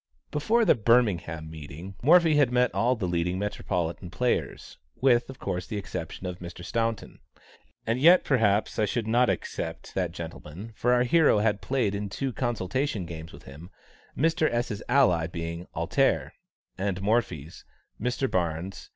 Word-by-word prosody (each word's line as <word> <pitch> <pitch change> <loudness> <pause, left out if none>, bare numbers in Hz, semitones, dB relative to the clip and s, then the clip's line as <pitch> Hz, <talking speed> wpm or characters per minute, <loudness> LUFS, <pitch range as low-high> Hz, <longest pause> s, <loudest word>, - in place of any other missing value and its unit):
Before 220 +11 +2
the - - +6
Birmingham 105 - +1
meeting, 80 +4 -9
Morphy 165 +3 +6
had 145 -4 +4
met 125 0 +2
all 125 +2 +2
the 105 -6 -3
leading 90 +1 -1
Metropolitan 90 -3 -3
players, 125 +7 -2 0.2
with, 125 -2 +3
of 135 - -9
course, 90 0 -4
the 105 - -4
exception 95 -2 -6
of 90 -1 -5
Mr. 90 0 -9
Staunton. 115 +2 -2 0.7
And 115 +2 0
yet 175 +4 +7
perhaps 110 -5 +1
I 110 - +3
should 115 +1 -2
not 120 +2 +3
except 80 -2 -4
that 90 -3 -1
gentleman, 85 +5 -8
for 125 - +1
our 125 0 +4
hero 145 -1 +4
had 105 -1 +1
played 125 -7 0
in 100 0 -3
two 135 +5 -3
consultation 120 -1 -2
games 80 -1 -8
with - - -13
him, 75 +6 -11 0.5
Mr. 160 +1 +2
S.'s 120 -3 -2
ally 90 -12 +4
being 85 +1 -6
"Alter," - - +1 0.5
and 95 -1 -1
Morphy's, 100 - -1 0.4
Mr. 125 +3 0
Barnes. 85 -1 -3
105 Hz, 155 wpm, -27 LUFS, 85-125 Hz, 0.7 s, yet